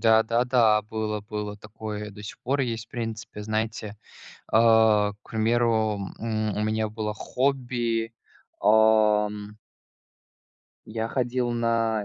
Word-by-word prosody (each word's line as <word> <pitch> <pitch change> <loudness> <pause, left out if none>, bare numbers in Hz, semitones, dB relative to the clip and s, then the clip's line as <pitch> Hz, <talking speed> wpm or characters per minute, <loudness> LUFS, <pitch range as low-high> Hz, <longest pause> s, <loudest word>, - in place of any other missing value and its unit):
Да-да-да. 115 0 +4
Было, 105 0 -3
было 105 0 -5
такое. 105 0 -7
До 105 0 -11
сих 100 - -8
пор 135 +3 0
есть, 115 -4 -2
в - - -51
принципе, 110 -3 -5
знаете. 110 0 -3 0.6
А, 110 -2 +5
к - - -22
примеру, 110 -2 +1 0.2
м, 110 -2 -2
у - - 0
меня 110 0 0
было 105 0 -3
хобби, 120 -2 -1 0.5
ам 105 -1 +3 1.3
я 110 +1 -3
ходил 125 0 -1
на 115 -2 0
110 Hz, 115 wpm, -26 LUFS, 105-115 Hz, 1.3 s, А